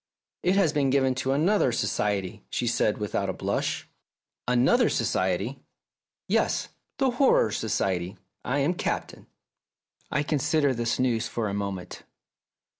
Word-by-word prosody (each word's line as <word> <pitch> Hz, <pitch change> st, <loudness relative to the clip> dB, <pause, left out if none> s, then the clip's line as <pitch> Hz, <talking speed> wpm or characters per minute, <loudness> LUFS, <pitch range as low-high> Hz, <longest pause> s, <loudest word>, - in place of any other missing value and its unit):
"It 185 Hz, +2 st, +2 dB
has 175 Hz, -6 st, +3 dB
been 140 Hz, -3 st, +2 dB
given 130 Hz, -1 st, +3 dB
to 130 Hz, -, 0 dB
another 160 Hz, +1 st, +3 dB
society," 100 Hz, -4 st, -1 dB
she 125 Hz, -, -2 dB
said 115 Hz, -2 st, +1 dB
without 100 Hz, -2 st, -2 dB
a -, -, -1 dB
blush. -, -, -2 dB, 0.6 s
"Another 125 Hz, -, +4 dB
society?" -, -, 0 dB, 0.7 s
"Yes, -, -, +1 dB, 0.3 s
the 265 Hz, -1 st, +2 dB
Horror 245 Hz, -, +3 dB
Society. 95 Hz, -3 st, -1 dB, 0.3 s
I 135 Hz, -, -1 dB
am 150 Hz, +6 st, +2 dB
Captain." -, -, -4 dB, 0.8 s
I -, -, 0 dB
considered 145 Hz, -2 st, +1 dB
this 120 Hz, 0 st, 0 dB
news 120 Hz, -3 st, +1 dB
for 115 Hz, -2 st, -2 dB
a -, -, -4 dB
moment. 100 Hz, -2 st, -4 dB
125 Hz, 130 wpm, -26 LUFS, 105-150 Hz, 0.8 s, Another